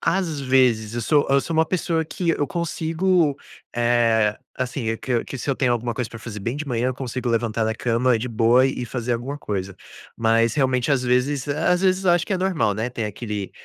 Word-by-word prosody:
Às 165 -3 0
vezes. 125 -5 +2
Eu 120 - -2
sou 145 +5 +2
eu 140 0 +4
sou 165 - -4
uma 160 0 +3
pessoa 165 -2 0
que 170 +2 -2
eu 145 -3 0
consigo, 170 -2 0 0.4
eh, 115 -3 +2 0.2
assim, 125 -2 -3
eh, 115 - -1
que 120 0 -1
que 135 - -7
se 120 - -6
eu - - +1
tenho 125 -2 +2
alguma 120 0 -1
coisa 125 -3 -3
pra 115 - -8
fazer 110 -1 -7
bem 120 +7 -3
de 150 - -5
manhã, 125 -1 0
eu 130 - -2
consigo 125 -1 -4
levantar 115 -1 0
da 110 0 -1
cama 120 +2 +1
de 125 +3 -4
boa 115 +3 +4
e 130 -2 -3
fazer 120 0 -3
alguma 125 +5 -3
coisa. 100 -6 -4 0.4
Mas 115 0 +2
realmente, 130 -1 +1
às 130 - +2
vezes 130 +3 0
às 160 +5 +1
vezes 190 0 +2
eu 180 - +5
acho 175 0 +3
que - - -2
é 190 - 0
normal, 180 - +1
né 110 +4 -2
ter 115 -2 -3
aquele 105 -1 -5
125 Hz, 225 wpm, -23 LUFS, 115-150 Hz, 0.4 s, eu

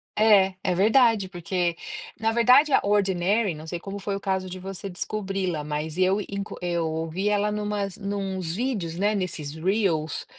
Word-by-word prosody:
É, 200 -3 +5
é 185 -2 +1
verdade 220 0 +4
porque, 175 -1 -1 0.4
na 225 0 +1
verdade 250 +6 +5
a - - +6
Ordinary, 200 0 +2
não 155 +1 -10
sei 175 +1 -4
como 195 +3 -6
foi 200 +1 -3
o - - -4
caso 190 -1 -2
de 185 +1 -7
você 195 +1 -6
descobri-la, 195 -3 -3
mas 150 +1 -3
eu 185 +2 +3
inclu 200 +1 -6
eu 170 -2 -1
ouvi 165 +5 -2
ela 210 0 +2
em 210 - -2
umas 205 -2 -2
em 200 -1 -4
uns 190 -4 -3
vídeos, 210 -8 -2
né, 205 +3 +2
nesses 170 -7 -3
reels 165 -3 0
195 Hz, 180 wpm, -25 LUFS, 175-205 Hz, 0.4 s, a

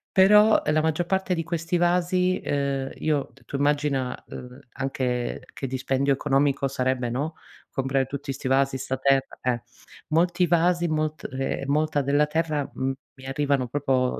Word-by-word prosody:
Però, 210 +3 +6
uhm, 150 - +2
la 155 - +3
maggior 160 +2 0
parte 190 +1 0
di 165 - -2
questi 170 +1 -1
vasi, 180 +1 +2
uhm, 140 -1 -1
io 150 -3 -1
t 135 - -22
tu 140 - -4
immagina, 145 -3 0
ehm, 125 +1 -9
anche 130 -3 -2
che 135 - -4
dispendio 130 +2 0
economico 140 0 +1
sarebbe, 130 -2 -1
no, 150 +6 -2 0.3
comprare 135 0 0
tutti 140 0 -5
sti 130 0 -5
vasi, 135 0 +2
sta 130 0 -3
terra, 135 0 +1
eh. 125 -2 0 0.5
Molti 175 +3 +2
vasi, 175 +1 +2
molt 155 0 -2
ehm, 135 +1 -2
molta 150 0 +1
della 145 +2 +3
terra 155 -2 -1
m 130 0 -1 0.3
mi 130 - -11
arrivano 135 -1 0
proprio 130 -1 0
140 Hz, 160 wpm, -25 LUFS, 135-160 Hz, 0.5 s, Però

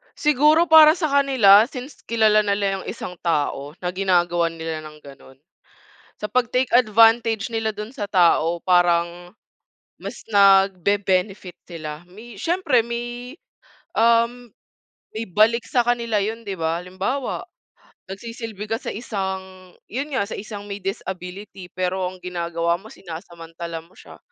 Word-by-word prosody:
Siguro 300 +3 +3
para 315 0 +9
sa 330 -4 -1
kanila 245 -7 +6
since 260 +1 -9
kilala 220 -2 +4
nila 200 -1 0
yung - - -10
isang 180 - -6
tao 145 -3 -1
na 180 - 0
ginagawan 175 -3 +1
nila 160 -1 -5
ng 150 0 -12
ganun. 135 -1 -15 0.9
Sa 210 - -2
pagtake 250 +1 +1
advantage 225 -1 +4
nila 225 -1 -1
dun 210 +2 -7
sa 215 -7 -4
tao 170 -2 +3
parang 175 0 +1 0.7
mas - - -8
nagbe-benefit 195 -1 +2
sila. 155 -2 -7
May 220 +4 -12
siyempre 325 -7 +2
may, 240 +3 -6 0.6
um, 235 +1 +2 0.6
may 220 +1 -3
balik 220 +5 +3
sa 250 - +1
kanila 235 -3 0
yun, 225 +3 -4
di 200 -2 -4
ba? 165 +1 -1
Halimbawa, 190 +9 -3 0.7
nagsisilbi 225 0 -7
ka 225 - 0
sa - - -4
isang 190 -4 -6
yun 275 +7 -5
nga, 200 - 0
sa - - -6
isang 205 -1 -8
may 200 0 -6
disability 190 -1 -6
pero 185 +1 -2
ang 185 0 -9
ginagawa 170 -1 -1
mo 215 +3 -14
sinasamantala 165 -1 -8
mo 175 - -25
siya - - -14
200 Hz, 135 wpm, -22 LUFS, 180-235 Hz, 0.9 s, para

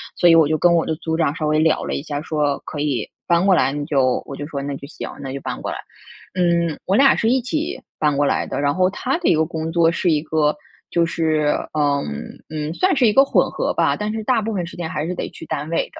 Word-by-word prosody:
所 175 - +4
以 165 - +7
我 160 -3 +6
就 155 0 0
跟 175 - +5
我 165 - +2
的 160 - -1
组 160 -1 -2
长 155 -2 +1
稍 155 -2 -2
微 155 0 +2
聊 160 0 +2
了 - - -3
一 140 - -4
下， 145 -2 -4
说 150 -3 -1
可 150 - -5
以 140 -7 -1 0.2
搬 170 +1 +3
过 190 - +6
来， 135 - +2
你 145 0 -3
就 135 -4 +1
我 140 - -6
就 145 - -6
说 140 -3 -5
那 140 0 -4
就 140 - -10
行， - - -7
那 135 -1 -5
就 140 - -5
搬 - - -5
过 - - -4
来。 - - -4 0.6
嗯， 170 -3 +1
我 190 - +1
俩 270 +1 +6
是 225 - +1
一 260 0 +2
起 305 +6 -2 0.2
搬 150 -2 +2
过 145 +1 +2
来 - - 0
的， - - -3
然 145 0 +2
后 185 0 +2
他 255 +9 -2
的 350 - -2
一 - - +5
个 160 0 +2
工 160 0 -4
作 165 0 +3
是 175 +1 0
一 150 -2 +2
个 155 -1 +1 0.3
就 170 -1 +2
是， 160 -2 0 0.3
呃， 145 -2 +1 0.5
嗯， 155 0 -4
算 370 - +2
是 255 - +3
一 215 - +5
个 270 +5 +6
混 - - +2
合 - - -1
吧， - - +1
但 210 +1 -3
是 220 -1 -4
大 235 -1 +2
部 220 +1 -3
分 180 -3 -2
时 170 - -10
间 165 -2 -4
还 150 +1 -3
是 180 - -2
得 - - -4
去 165 - -10
单 150 +2 -3
位 170 - +1
的 - - -11
160 Hz, 300 characters per minute, -21 LUFS, 150-180 Hz, 0.6 s, 以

